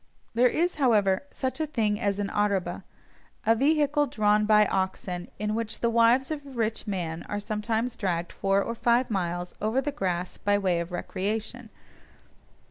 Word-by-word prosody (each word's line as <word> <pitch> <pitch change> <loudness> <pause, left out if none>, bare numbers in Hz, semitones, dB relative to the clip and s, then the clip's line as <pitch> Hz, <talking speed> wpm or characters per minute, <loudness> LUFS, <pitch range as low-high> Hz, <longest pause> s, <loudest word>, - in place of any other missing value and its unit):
There 240 +2 +5
is, 345 +5 0
however, 210 -2 +3
such 260 +1 -3
a 315 - 0
thing 215 -7 0
as 200 -1 0
an 205 -1 -2
"araba," 200 -3 0 0.6
a 225 - +5
vehicle 290 +3 +2
drawn 210 -2 +2
by 210 -1 +6
oxen, 190 -2 -2
in 210 0 -2
which 225 0 -3
the 235 - +2
wives 235 +4 +4
of 300 -2 -3
a 280 - -12
rich 225 -3 -2
man 170 -5 -3
are 205 - -2
sometimes 220 +3 -2
dragged 175 -6 -2
four 195 0 +1
or 230 - -3
five 235 +1 +2
miles 175 -2 -2
over 220 +5 +1
the 290 +2 -1
grass 180 -7 -3
by 205 0 +2
way 185 -4 +1
of 170 +1 -5
recreation. 215 +6 -3
215 Hz, 170 wpm, -27 LUFS, 195-240 Hz, 0.6 s, by